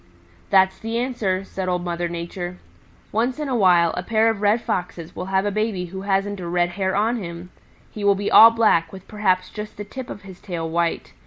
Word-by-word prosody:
"That's 190 -1 +4
the 225 +1 -3
answer," 230 -7 -1
said 190 -1 -4
Old 180 -1 -1
Mother 175 0 -2
Nature. 175 +1 -5 0.5
"Once 240 +4 0
in 300 -1 -3
a 260 - -1
while 175 -6 +4
a - - -2
pair 220 +4 +2
of 210 -2 -6
Red 210 +3 +3
Foxes 180 -6 -4
will 180 - -5
have 190 +1 0
a 205 - 0
baby 210 -3 -1
who 190 - -5
hasn't 200 0 -1
a 175 - -5
red 175 0 +1
hair 190 +1 -2
on 225 +4 +1
him. 175 -2 -7 0.4
He 210 - -7
will 200 0 +4
be 200 +1 -2
all 225 - +10
black, 215 -8 +2
with 190 -1 -12
perhaps 185 -4 0
just 210 0 -8
the 205 - -5
tip 255 +3 -8
of 205 - -8
his 190 -2 -12
tail 170 -4 -4
white. 170 +1 -1
195 Hz, 220 wpm, -22 LUFS, 180-215 Hz, 0.5 s, all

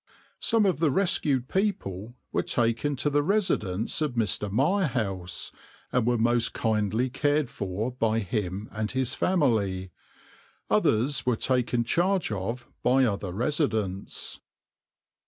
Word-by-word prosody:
Some 225 -3 +3
of 185 -6 +1
the 160 -2 +3
rescued 140 -6 +1
people 120 - -2 0.2
were - - +1
taken 120 +5 0
to 145 +2 0
the 145 +1 +3
residence 145 - 0
of 150 -4 0
Mr. 105 -2 0
Mirehouse, 115 - 0 0.4
and 125 -2 +1
were 120 -1 +3
most 120 +1 +2
kindly 110 +2 0
cared 145 0 +1
for 100 +5 -3
by 115 -3 0
him 100 -1 -2
and 110 0 -2
his 130 0 +1
family; 105 - +1 0.8
others 125 +5 +3
were 125 - +3
taken 125 -1 +1
charge 175 - +1
of 110 +5 -4
by 130 +1 +4
other 100 -4 -2
residents. 110 - -2
120 Hz, 125 wpm, -27 LUFS, 105-145 Hz, 0.8 s, by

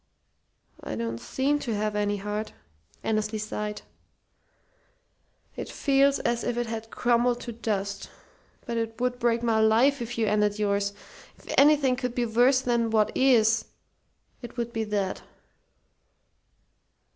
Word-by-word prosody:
"I - - -4
don't 115 0 -3
seem 280 - 0
to 235 -6 -3
have 210 0 -1
any 205 0 0
heart," 210 +2 -4 0.5
Annesley 215 0 -1
sighed. 210 0 -4 1.7
"It - - -6
feels 275 0 +3
as 235 0 -1
if 240 -1 -2
it 240 - 0
had 225 -1 -6
crumbled 240 0 +1
to 240 - -6
dust. 200 -3 -3 0.6
But 235 -1 -3
it 225 -1 -3
would 250 0 -1
break 235 -1 +1
my 225 -2 +2
life 235 +5 +4
if 235 0 -5
you 225 - +2
ended 210 0 +1
yours. 200 -1 0 0.4
If - - -8
anything 285 -3 +5
could 250 -2 -3
be 245 - +1
worse 245 +4 +3
than 235 -2 +1
what 215 -1 +1
is, 230 -4 +4 0.8
it 240 0 -10
would 235 0 -3
be 225 -2 -1
that." 205 -2 -2
225 Hz, 140 wpm, -26 LUFS, 210-245 Hz, 1.7 s, anything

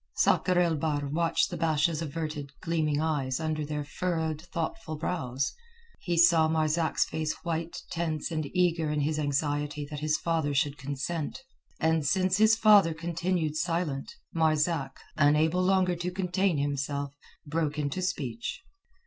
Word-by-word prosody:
Sakr 180 -1 +3
el 170 -3 +3
Bahr 145 -1 -1
watched 165 +3 +1
the 175 - -3
Basha's 160 0 +1
averted, 155 -2 -4
gleaming 155 -3 0
eyes 145 -4 0
under 155 -1 -1
their 150 0 -3
furrowed, 160 0 -2
thoughtful 165 +1 -4
brows, 140 -5 -2 0.5
he 175 -2 -2
saw 165 -1 +6
Marzak's 160 0 +1
face 155 -1 -2
white, 165 0 -3
tense 165 -2 -2
and 155 -3 -2
eager 170 -3 +2
in 150 -1 0
his 155 +2 0
anxiety 145 0 -1
that 150 - -4
his 155 0 +1
father 160 -4 -1
should 140 +1 +1
consent. 145 - -4 0.4
And 160 -1 +2
since 185 +6 +2
his 220 +1 +6
father 205 -7 +6
continued 170 -1 -1
silent, 165 -5 -1 0.2
Marzak, 160 -1 +1 0.2
unable 155 +4 +3
longer 185 -1 +3
to 175 +1 -3
contain 185 -1 0
himself, 140 0 -2 0.3
broke 155 0 -1
into 150 +4 -2
speech. 150 - -3
160 Hz, 140 wpm, -28 LUFS, 145-170 Hz, 0.5 s, saw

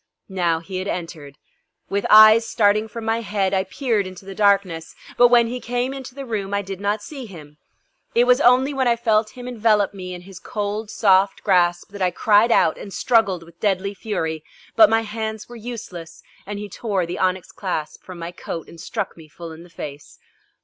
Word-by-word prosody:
Now 175 -4 0
he 185 +2 -6
had 185 +2 -4
entered. 160 -6 -6 0.5
With 200 0 -1
eyes 215 +1 +8
starting 215 0 +2
from 220 +1 -8
my 225 +1 0
head 200 -3 -1
I 190 0 +1
peered 220 -2 -1
into 185 +1 -11
the 195 - -7
darkness, 195 -5 +1 0.2
but 245 - +7
when 240 -1 +5
he 245 +2 -4
came 245 +2 -2
into 265 -2 -9
the 275 -1 -6
room 200 -4 -3
I 200 - -1
did 195 0 -7
not 205 +1 -1
see 270 -5 -8
him. 150 -6 -13 0.6
It 235 - +5
was 250 +2 +4
only 260 +3 +4
when 265 -2 +1
I 235 - +4
felt 220 -1 0
him 250 0 -7
envelope 215 -4 +2
me 180 -2 -7
in 175 - -9
his 190 0 -12
cold 210 -1 -4
soft 195 -2 +3
grasp 175 -2 +2
that 200 -1 -9
I 185 - +3
cried 210 +5 +3
out 160 - +3
and 200 - -9
struggled 195 -3 +1
with 170 0 -18
deadly 200 -1 0
fury, 160 -7 -3 0.3
but 325 -2 +7
my 225 0 +3
hands 220 0 -5
were 240 - -11
useless 220 -8 -8 0.2
and 205 0 -5
he 205 0 -6
tore 200 -2 -2
the 175 +1 -5
onyx 185 -1 -1
clasp 175 -6 -4
from 185 -1 -10
my 170 0 -6
coat 170 -2 -7
and 165 - -12
struck - - -4
me 160 -2 -14
full 165 +2 -10
in 160 +1 -11
the 175 - -14
face. 145 -3 -9
200 Hz, 205 wpm, -22 LUFS, 180-225 Hz, 0.6 s, eyes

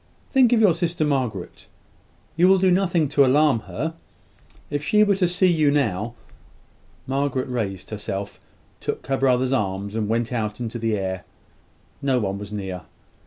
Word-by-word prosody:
Think 260 -3 +5
of 240 - +4
your 205 -6 +5
sister, 170 -1 -1
Margaret. 125 -10 -3 0.7
You 175 +3 +4
will 190 0 +6
do 185 0 +3
nothing 175 -4 +2
to 140 0 +4
alarm 140 -1 +4
her. 160 +6 -3 0.8
If 145 0 -2
she 210 +7 +4
were 205 -1 +3
to 185 -2 +2
see 180 +2 +2
you 155 -3 +3
now 115 -6 0 0.4
." - - -34
Margaret 135 -1 -1
raised 105 -8 -4
herself; 100 -1 -5 0.4
took - - -4
her 135 0 0
brother's 130 -1 +2
arm, 100 -4 -1
and 110 -2 -2
went 115 +1 0
out 110 -2 -2
into 120 -1 -4
the 110 -1 0
air. 95 -2 -3 0.8
No 135 -2 +1
one 100 -2 -2
was 105 0 -8
near. 95 -3 -5
130 Hz, 165 wpm, -23 LUFS, 105-160 Hz, 0.8 s, will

